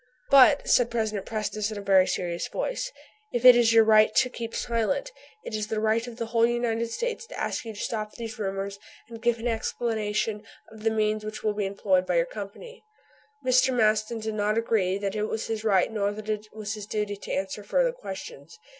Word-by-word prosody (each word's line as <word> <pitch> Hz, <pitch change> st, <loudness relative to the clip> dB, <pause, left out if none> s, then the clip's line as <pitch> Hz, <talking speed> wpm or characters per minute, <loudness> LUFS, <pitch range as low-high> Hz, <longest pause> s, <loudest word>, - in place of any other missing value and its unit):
"But," 275 Hz, +1 st, +7 dB
said 245 Hz, -1 st, +4 dB
President 215 Hz, -4 st, -2 dB
Prestice 215 Hz, -1 st, -2 dB
in 215 Hz, -, -5 dB
a -, -, -5 dB
very 190 Hz, -2 st, +4 dB
serious 170 Hz, -1 st, -2 dB
voice, -, -, -3 dB, 0.4 s
"if 240 Hz, +1 st, -1 dB
it 250 Hz, -1 st, +11 dB
is 235 Hz, -1 st, +4 dB
your 225 Hz, -1 st, +7 dB
right 215 Hz, 0 st, +5 dB
to 255 Hz, -, +3 dB
keep 230 Hz, -2 st, -6 dB
silent, 240 Hz, -, -1 dB, 0.3 s
it -, -, -7 dB
is 215 Hz, -1 st, -2 dB
the 220 Hz, -1 st, -2 dB
right 220 Hz, +2 st, +1 dB
of 240 Hz, -, -8 dB
the 230 Hz, -, -2 dB
whole 230 Hz, 0 st, +3 dB
United 235 Hz, -1 st, 0 dB
States 460 Hz, -, -3 dB
to -, -, -8 dB
ask -, -, -2 dB
you 220 Hz, -1 st, -7 dB
to -, -, -9 dB
stop 215 Hz, -2 st, -3 dB
these 230 Hz, 0 st, -7 dB
rumors 195 Hz, 0 st, -3 dB, 0.3 s
and 230 Hz, -1 st, -10 dB
give 240 Hz, 0 st, +2 dB
an 230 Hz, +2 st, -3 dB
explanation 220 Hz, -2 st, -1 dB, 0.3 s
of 220 Hz, -1 st, -13 dB
the 225 Hz, -, +2 dB
means 215 Hz, -1 st, 0 dB
which 215 Hz, 0 st, -6 dB
will 215 Hz, -1 st, +1 dB
be 205 Hz, -1 st, -1 dB
employed 190 Hz, -2 st, +1 dB
by 180 Hz, -, 0 dB
your 170 Hz, 0 st, +3 dB
Company," 215 Hz, -, -9 dB, 0.6 s
Mr. 255 Hz, +1 st, +4 dB
Maston 215 Hz, 0 st, +2 dB
did 220 Hz, 0 st, -4 dB
not 210 Hz, +1 st, 0 dB
agree 205 Hz, -5 st, +1 dB
that 200 Hz, -1 st, -3 dB
it 210 Hz, 0 st, -1 dB
was 220 Hz, 0 st, -3 dB
his 220 Hz, -1 st, -3 dB
right 200 Hz, -2 st, +3 dB
nor 205 Hz, -2 st, 0 dB
that 215 Hz, +1 st, -8 dB
it 215 Hz, 0 st, -2 dB
was 215 Hz, -1 st, -5 dB
his 210 Hz, -2 st, -7 dB
duty 210 Hz, -1 st, -2 dB
to -, -, -8 dB
answer 195 Hz, +2 st, -3 dB
further -, -, +2 dB
questions. 170 Hz, -, -9 dB
215 Hz, 215 wpm, -26 LUFS, 205-230 Hz, 0.6 s, it